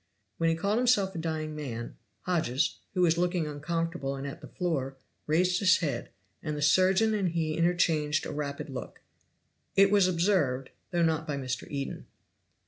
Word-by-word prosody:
When 165 0 +3
he 165 - +2
called 200 +7 0
himself 235 -6 +3
a 170 - -4
dying 155 -1 -3
man, 120 -6 -5 0.3
Hodges, 160 -5 0 0.2
who 180 - +3
was 170 -1 +3
looking 175 -2 +1
uncomfortable 155 -1 -2
and 135 +1 -6
at 140 - -7
the - - -9
floor, 140 -7 -2 0.3
raised 180 +4 +2
his 185 -2 +5
head, 140 -8 -3 0.3
and 150 -1 -3
the - - -4
surgeon 190 +7 +4
and 200 -4 +1
he 160 -2 -1
interchanged 165 -3 +2
a - - -4
rapid 145 -1 -4
look; 130 - -7 0.7
it 195 0 +6
was 200 -3 +5
observed, 165 -8 +1 0.2
though 175 -1 +1
not 160 0 +1
by 145 -2 -2
Mr. 130 -2 -4
Eden. 140 -1 -5
165 Hz, 170 wpm, -29 LUFS, 145-180 Hz, 0.7 s, it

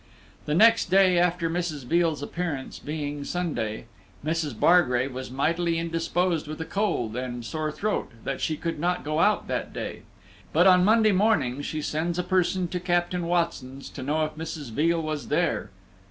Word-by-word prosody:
The 150 - +1
next 225 +1 +5
day 185 -1 +5
after 175 -1 +1
Mrs. 165 -4 -2
Veal's 165 0 +1
appearance, 155 -4 -4
being 145 -1 -4
Sunday, 140 -11 -3 0.4
Mrs. 155 -7 -2
Bargrave 130 -7 +4
was 130 +1 -6
mightily 165 +6 0
indisposed 165 0 0
with 155 +1 -6
a 160 - -3
cold 160 - -1
and 125 -1 -4
sore 155 +1 -2
throat, 210 +7 -2
that 135 - -3
she 155 - -1
could 165 -1 -3
not 180 +3 0
go 155 +1 -1
out - - +3
that - - -3
day; - - -5 0.5
but 175 +4 +5
on 180 -1 +6
Monday 220 +2 +5
morning 185 - +2
she 155 +1 -4
sends 165 +4 -1
a 180 - 0
person 185 0 +1
to 180 - -2
Captain 175 0 0
Watson's 165 -6 -2
to 140 - -8
know 150 +4 0
if 155 - -6
Mrs. 155 -5 -6
Veal 165 +7 +2
was 155 -2 -3
there. - - 0
165 Hz, 170 wpm, -26 LUFS, 145-175 Hz, 0.5 s, on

